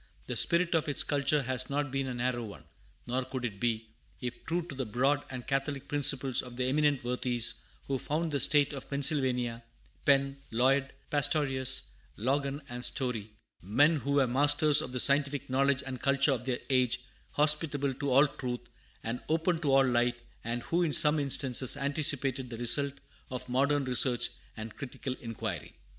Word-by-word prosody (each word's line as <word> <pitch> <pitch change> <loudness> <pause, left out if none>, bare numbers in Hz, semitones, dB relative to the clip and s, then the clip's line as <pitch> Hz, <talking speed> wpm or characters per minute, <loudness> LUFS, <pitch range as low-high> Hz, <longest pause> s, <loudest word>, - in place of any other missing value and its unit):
The - - -4
spirit 170 0 +2
of 160 -2 +1
its 145 - 0
culture 145 0 0
has 130 0 -1
not 145 0 -2
been 135 0 -2
a 130 - -4
narrow 120 0 -1
one, 105 -3 -10 0.4
nor 125 +2 -1
could 130 -1 -5
it 100 -4 -5
be, 115 -1 -1 0.3
if 125 -1 -6
true 170 +1 -2
to 170 - -8
the 135 0 -3
broad 135 +6 +1
and 130 -2 -7
catholic 135 0 -2
principles 135 -3 +1
of 125 -1 -11
the 125 - -1
eminent 145 +1 +1
worthies 125 -1 0 0.2
who 135 -1 -2
founded 160 +4 -2
the 140 - 0
State 145 +2 +3
of 135 - -8
Pennsylvania, 130 -5 +1 0.4
Penn, 140 -1 +2
Lloyd, 135 +3 +1 0.2
Pastorius, 145 -3 +1 0.3
Logan, 140 +5 -1
and 120 0 -7
Story; 125 -7 -1 0.3
men 145 - +3
who 140 0 -2
were 140 -2 +4
masters 145 +4 +4
of 125 - -6
the 125 - -3
scientific 140 0 +2
knowledge 135 0 +1
and 130 -2 -6
culture 140 +1 +3
of 125 -2 -2
their 130 -2 -1
age, 125 -2 +2 0.3
hospitable 150 -2 +3
to 140 +2 -4
all 135 +3 +6
truth, 125 -4 -5 0.4
and 115 +2 -4
open 165 +2 +1
to 150 -4 0
all 135 0 +5
light, 120 -1 +1 0.2
and 120 +1 -3
who 170 +2 0
in 165 -4 0
some 150 0 +6
instances 135 -2 +2
anticipated 140 -2 +1
the 115 - -7
result 140 +4 +1 0.4
of 125 -1 -6
modern 140 +3 +1
research 125 -1 +2 0.3
and 110 0 -7
critical 135 -1 -5
inquiry. 115 -2 -6
135 Hz, 175 wpm, -30 LUFS, 125-145 Hz, 0.4 s, all